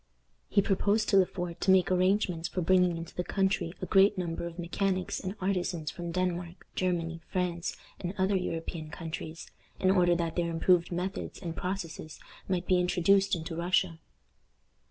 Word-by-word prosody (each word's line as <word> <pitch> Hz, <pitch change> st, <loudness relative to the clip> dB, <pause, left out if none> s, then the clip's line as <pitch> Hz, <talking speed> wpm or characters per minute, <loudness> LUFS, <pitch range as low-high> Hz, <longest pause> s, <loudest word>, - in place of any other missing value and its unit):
He 200 Hz, -, +3 dB
proposed 205 Hz, +2 st, +1 dB
to 195 Hz, -, +5 dB
Le 185 Hz, -2 st, +5 dB
Fort 175 Hz, -2 st, -5 dB
to -, -, 0 dB
make 190 Hz, -1 st, +5 dB
arrangements 185 Hz, -2 st, +2 dB
for 185 Hz, -, -2 dB
bringing 180 Hz, 0 st, +4 dB
into 165 Hz, 0 st, -7 dB
the 180 Hz, -, -2 dB
country 190 Hz, -3 st, 0 dB
a -, -, +1 dB
great 200 Hz, 0 st, +5 dB
number 170 Hz, -1 st, -2 dB
of 170 Hz, 0 st, -9 dB
mechanics 185 Hz, +2 st, -1 dB
and 190 Hz, +1 st, -4 dB
artisans 180 Hz, -4 st, -1 dB
from 175 Hz, -1 st, -5 dB
Denmark, 175 Hz, -1 st, -2 dB
Germany, 170 Hz, -2 st, -1 dB
France, 180 Hz, -2 st, -2 dB, 0.2 s
and 180 Hz, +2 st, -4 dB
other 190 Hz, +1 st, +2 dB
European 165 Hz, -3 st, -3 dB
countries, 160 Hz, 0 st, -7 dB, 0.3 s
in 185 Hz, -, +4 dB
order 175 Hz, -2 st, +4 dB
that 170 Hz, -1 st, -2 dB
their 170 Hz, -1 st, 0 dB
improved 170 Hz, +1 st, +3 dB
methods 180 Hz, +2 st, -3 dB
and 170 Hz, -3 st, -5 dB
processes 175 Hz, -4 st, -5 dB, 0.3 s
might 180 Hz, -2 st, 0 dB
be 185 Hz, 0 st, +3 dB
introduced 180 Hz, +2 st, +3 dB
into 165 Hz, 0 st, -5 dB
Russia. 170 Hz, -1 st, +1 dB
180 Hz, 165 wpm, -30 LUFS, 170-190 Hz, 0.3 s, to